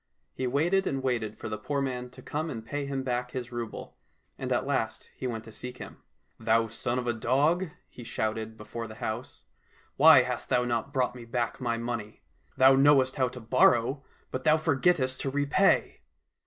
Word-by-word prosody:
He 130 - -2
waited 170 +9 +2
and 135 -1 -2
waited 115 -5 -1
for - - -6
the 110 -1 -4
poor 140 +6 -2
man 125 -2 -3
to 130 0 -14
come 155 +2 -3
and 115 -5 -6
pay 140 +4 -3
him 135 -1 -2
back 125 -1 -2
his 125 -1 -6
rouble, 120 -2 -6 0.4
and 130 -1 -5
at 125 - +1
last 115 -5 -2
he 130 - -4
went 115 -3 -4
to 110 - -12
seek 125 +3 -7
him. - - -9 0.2
" - - -45
Thou 115 0 +2
son 120 +2 -2
of 125 - -2
a 120 - +1
dog," 145 +10 +2 0.2
he 120 - -12
shouted, 110 -1 -3
before 115 +2 -6
the 110 - -10
house, 120 +1 -5 0.3
" - - -33
why 145 -3 +8
hast 125 -1 -4
thou 125 -1 +2
not 120 +2 -2
brought 130 -3 0
me 125 -1 -10
back 120 +1 -2
my 120 -2 0
money? 115 -3 -5 0.3
Thou 130 +1 +7
knowest 135 -1 +4
how 130 -1 +3
to 125 +1 -8
borrow, 130 +3 +3 0.3
but 130 - -4
thou 155 0 +5
forgettest 150 -3 +1
to 135 - -1
repay 145 +8 +2
125 Hz, 200 wpm, -28 LUFS, 115-135 Hz, 0.4 s, why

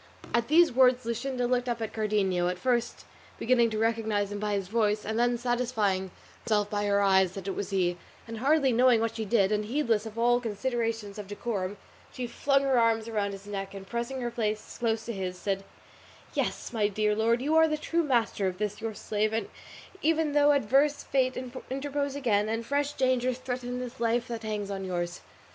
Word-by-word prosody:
At 235 0 +2
these 335 +3 +5
words 255 -1 +4
Luscinda 245 +2 -2
looked 250 0 0
up 235 -1 -1
at 225 -1 -4
Cardenio, 200 -5 +1
at 180 0 -1
first 240 +3 -1 0.3
beginning 235 -1 +3
to 215 - -3
recognise 220 -2 0
him 205 - -4
by 210 0 -1
his 195 -2 -2
voice 210 0 +1
and 220 +2 -1
then 240 0 +2
satisfying 235 -6 0 0.3
herself 210 -1 0
by 205 0 0
her 200 0 +2
eyes 190 -2 +4
that 195 -1 -7
it - - 0
was 205 - -3
he, 180 -3 0 0.3
and 225 -1 -6
hardly 280 +1 +3
knowing 245 0 +5
what 225 0 -1
she 225 -1 -3
did, 205 -2 +2
and 210 0 0
heedless 230 -3 0
of 220 +1 -10
all 240 +1 +3
considerations 225 -2 -2
of 205 - -7
decorum, 205 -2 -3 0.3
she 255 - -4
flung 275 +3 +1
her 265 -3 +3
arms 225 -1 +2
around 205 -3 -1
his 195 0 -9
neck 200 -1 -5
and 195 -1 -8
pressing 240 +4 -3
her 240 -1 -2
face 215 -2 -3
close 225 -1 0
to 235 - -4
his, 185 -2 -4
said, 195 +1 -2 0.7
"Yes, - - -2
my 215 -3 +2
dear 210 +1 0
lord, 230 +2 +2
you 295 +5 0
are 320 0 +6
the 305 -1 -1
true 335 +3 0
master 235 - +1
of 180 -1 -3
this 210 +1 -3
your 225 -1 -4
slave, 215 +1 -1 0.5
even 320 -1 +2
though 290 0 +5
adverse 280 +3 +2
fate 260 -1 +1 0.3
interpose 280 +1 -2
again, 215 -6 +1
and 225 +1 -2
fresh 285 +2 0
dangers 255 -2 +1
threaten 250 -1 -4
this 250 -2 -7
life 235 +1 +1
that 230 -1 -4
hangs 210 -2 -3
on 195 -1 -4
yours." 175 -1 -3
225 Hz, 200 wpm, -28 LUFS, 205-250 Hz, 0.7 s, are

